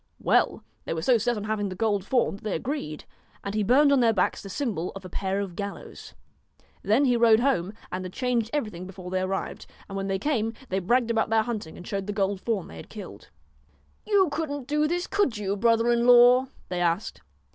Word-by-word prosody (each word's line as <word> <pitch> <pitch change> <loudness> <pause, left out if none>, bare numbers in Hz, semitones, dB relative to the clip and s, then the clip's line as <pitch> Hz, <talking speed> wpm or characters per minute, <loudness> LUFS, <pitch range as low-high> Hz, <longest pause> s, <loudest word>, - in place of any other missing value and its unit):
Well - - +1 0.2
they - - -2
were 160 - -3
so 240 +4 +4
set 240 +2 0
on 205 - -4
having 210 -1 -1
the 185 - -6
gold 205 -1 0
fawn 240 -2 +1
that - - -20
they 215 - -2
agreed, 160 - -4 0.4
and 200 - -4
he 215 - 0
burned 270 +8 +5
on 280 - +4
their 230 -2 +4
backs 185 -4 0
the 195 - -9
symbol 195 - -2
of 195 -1 -9
a - - -7
pair 195 +2 -2
of 195 -4 -4
gallows. 200 +1 -7 0.7
Then 230 +8 +3
he 250 -2 +3
rode 230 -2 +5
home, 235 -8 +1 0.2
and 185 0 -3
had 185 - -6
changed 240 -1 -1
everything 210 - -3
before 185 -1 -9
they 185 0 0
arrived; 190 +1 -3 0.2
and 195 - -8
when 195 0 -2
they 195 0 0
came, 225 -1 -1 0.2
they 190 - 0
bragged 235 +5 +1
about 225 0 +1
their 220 0 +3
hunting 215 -9 -5
and 180 - -10
showed 195 0 -4
the 205 - -2
gold 195 -1 -1
fawn 215 -6 -2
they 80 - -11
had 80 - -11
killed. - - -10 0.8
1 420 - 0
You 380 -4 +5
couldn't 290 -3 -3
do 300 +1 +1
this, 350 +2 -1
could 395 - 0
you, 200 -1 -2
brother 230 +2 +3
in 235 0 +2
law? 245 +1 +7
' - - -29
they 180 -1 -2
asked. 175 - -1
215 Hz, 230 wpm, -26 LUFS, 190-245 Hz, 0.8 s, law